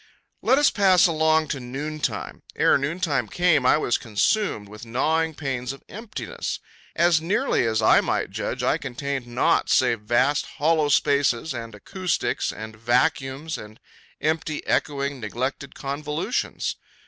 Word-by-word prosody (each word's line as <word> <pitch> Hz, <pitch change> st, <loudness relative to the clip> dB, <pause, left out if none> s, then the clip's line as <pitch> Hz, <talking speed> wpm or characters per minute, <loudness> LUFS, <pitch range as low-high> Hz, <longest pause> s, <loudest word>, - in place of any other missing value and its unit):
Let 260 Hz, -, +4 dB
us 290 Hz, 0 st, +4 dB
pass 190 Hz, -3 st, +5 dB
along 160 Hz, -2 st, +2 dB
to 140 Hz, -, -2 dB
noontime. 145 Hz, +5 st, -4 dB
Ere -, -, +4 dB
noontime 140 Hz, -3 st, 0 dB
came 160 Hz, -3 st, +2 dB
I -, -, +5 dB
was 120 Hz, -, 0 dB
consumed 110 Hz, -, 0 dB
with 105 Hz, +2 st, -11 dB
gnawing 155 Hz, +7 st, 0 dB
pains 135 Hz, -3 st, -3 dB
of 135 Hz, -, -14 dB
emptiness. 215 Hz, +1 st, -5 dB, 0.4 s
As 170 Hz, -2 st, +4 dB
nearly 185 Hz, -, +1 dB
as 110 Hz, -1 st, 0 dB
I -, -, +6 dB
might -, -, -1 dB
judge, -, -, -3 dB
I -, -, +2 dB
contained 135 Hz, 0 st, -4 dB
naught 120 Hz, +1 st, +1 dB
save 115 Hz, -, +3 dB
vast 125 Hz, +6 st, +1 dB
hollow 155 Hz, 0 st, +2 dB
spaces 140 Hz, 0 st, +2 dB
and 115 Hz, -2 st, -7 dB
acoustics 185 Hz, -, -2 dB
and 110 Hz, +1 st, -8 dB
vacuums 135 Hz, +5 st, 0 dB
and 105 Hz, +1 st, -11 dB, 0.4 s
empty, 155 Hz, 0 st, -1 dB
echoing, 140 Hz, -1 st, -1 dB
neglected 130 Hz, +5 st, -4 dB
convolutions. 150 Hz, -, -3 dB
140 Hz, 135 wpm, -24 LUFS, 120-160 Hz, 0.4 s, I